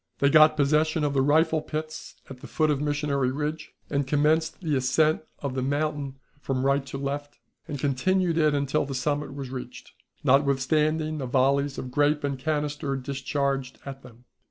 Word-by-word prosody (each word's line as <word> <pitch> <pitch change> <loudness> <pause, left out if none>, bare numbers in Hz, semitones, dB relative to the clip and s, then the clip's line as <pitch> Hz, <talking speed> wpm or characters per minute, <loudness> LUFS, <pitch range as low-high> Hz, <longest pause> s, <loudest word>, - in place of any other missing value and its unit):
They 140 0 +3
got 155 0 +6
possession 155 +2 +2
of 145 -1 0
the 135 - +2
rifle 155 +3 +3
pits 155 0 -6
at 135 -2 -10
the - - -9
foot 155 -1 +1
of 145 -1 -1
Missionary 145 -3 0
Ridge, 150 +3 -4
and 140 -2 -1
commenced 155 +3 +1
the 160 -5 -1
ascent 155 +4 +2 0.2
of 140 -2 -2
the 130 - -2
mountain 145 0 -2 0.2
from 135 -2 -2
right 140 0 +2
to 135 - -5
left, 145 +1 -4 0.3
and 145 - -4
continued 165 +6 +1
it 155 -2 +3
until 140 +1 0
the 135 - -4
summit 145 +1 -2
was 135 -2 -6
reached, 125 -1 -8 0.3
notwithstanding 150 +3 +2
the 130 - -3
volleys 135 +2 +1
of 125 - -6
grape 145 +3 +2
and 140 -2 -2
canister 150 -1 -2
discharged 135 0 -2
at 135 -1 -7
them. 125 -1 -16
145 Hz, 175 wpm, -26 LUFS, 135-155 Hz, 0.3 s, got